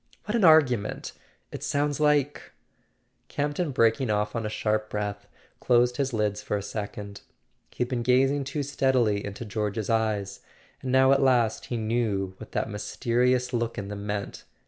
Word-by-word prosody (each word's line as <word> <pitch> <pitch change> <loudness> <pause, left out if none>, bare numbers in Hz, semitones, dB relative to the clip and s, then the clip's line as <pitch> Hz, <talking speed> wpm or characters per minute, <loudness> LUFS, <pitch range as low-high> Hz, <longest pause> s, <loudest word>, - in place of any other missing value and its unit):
"What 210 - -3
an 230 - +2
argument! 145 - +4 0.4
It - - -7
sounds 145 0 -1
like 145 -1 +1 0.4
" - - -45
Camp 145 0 -1
ton, 175 -4 0
breaking 115 -1 +2
off 105 +1 0
on 115 -2 -2
a - - -3
sharp 110 0 -1
breath, 105 -1 -4 0.3
closed 125 0 +3
his 135 -1 0
lids 105 -2 -1
for 105 - -2
a 100 - -5
second. 100 -1 -6 0.5
He - - -2
had 120 - -6
been 125 -3 -1
gazing 135 +3 +2
too 145 +2 -3
steadily 130 -7 +1
into 100 +3 -6
George's 105 0 -2
eyes, 105 -3 -1 0.4
and 130 - -3
now 130 +1 +5
at 135 0 +4
last 120 -4 +2
he 120 - -3
knew 110 -4 -1
what 110 - -11
that - - -1
mysterious 125 +4 0
look 115 -1 -1
in 100 -1 -5
them 100 0 -6
meant. 100 -1 -4
115 Hz, 175 wpm, -26 LUFS, 105-130 Hz, 0.5 s, now